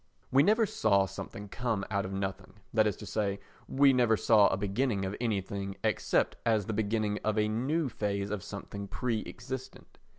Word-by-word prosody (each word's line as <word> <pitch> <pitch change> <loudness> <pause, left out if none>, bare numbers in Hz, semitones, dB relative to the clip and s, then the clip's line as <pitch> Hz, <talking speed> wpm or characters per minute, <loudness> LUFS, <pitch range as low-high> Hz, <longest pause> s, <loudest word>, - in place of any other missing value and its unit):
We 135 - +6
never 220 +7 +4
saw 100 - +2
something 100 +2 -7
come 110 -1 -2
out 100 -1 0
of 95 - -5
nothing, 95 0 -4 0.2
that 110 -1 +4
is 105 - 0
to - - -10
say, 100 -2 -1 0.3
we 140 0 +5
never 120 -3 +3
saw 105 -2 +5
a - - 0
beginning 100 +1 0
of 95 +2 -3
anything 100 -3 -2
except - - +1
as 110 -4 +2
the 110 - -3
beginning 105 0 0
of 110 0 0
a 105 0 +3
new 135 +9 0
phase 100 -3 -2
of 105 -2 -2
something 100 +1 -7
pre 115 +1 -2
existent. 130 +2 -8
105 Hz, 185 wpm, -30 LUFS, 100-115 Hz, 0.3 s, We